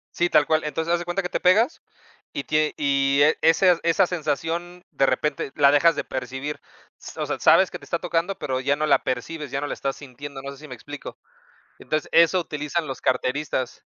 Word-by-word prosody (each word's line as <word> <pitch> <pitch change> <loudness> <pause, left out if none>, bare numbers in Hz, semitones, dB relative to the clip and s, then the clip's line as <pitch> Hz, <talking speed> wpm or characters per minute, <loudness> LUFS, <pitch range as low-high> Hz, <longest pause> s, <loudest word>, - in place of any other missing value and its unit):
Sí, 175 - +2
tal 145 - +4
cual. 155 -1 +1
Entonces, 160 +3 -2
haz 175 - +3
de 175 - -5
cuenta 175 +3 -2
que 180 - -3
te - - -3
pegas 215 - +3 0.5
y 140 - -4
tie 155 0 +1
y, 140 -1 +2
eh, 155 +1 +4
ese 170 +2 +4
esa 170 +3 +3
sensación, 175 +1 -3
de 135 - +2
repente, 140 -1 -1
la 140 -1 +6
dejas 150 +3 +4
de - - -2
percibir. 130 +3 -5 0.4
S - - -9
o - - -1
sea, - - -3
sabes - - +5
que - - -7
te - - -15
está - - -2
tocando, 175 +4 -2
pero 130 -2 -2
ya 140 +2 +1
no 155 +1 -1
la - - +3
percibes, 140 +4 -4
ya 135 +1 -2
no 145 - -3
la - - -3
estás 135 -1 -3
sintiendo, 140 0 -9
no 140 - -6
sé 140 - -13
si 155 +1 -12
me 125 - -7
explico. 145 +4 -9 0.6
Entonces, 155 -1 -3
eso 170 +2 +5
utilizan 155 0 -3
los 135 - -6
carteristas. 130 0 -2
150 Hz, 220 wpm, -24 LUFS, 140-170 Hz, 0.6 s, la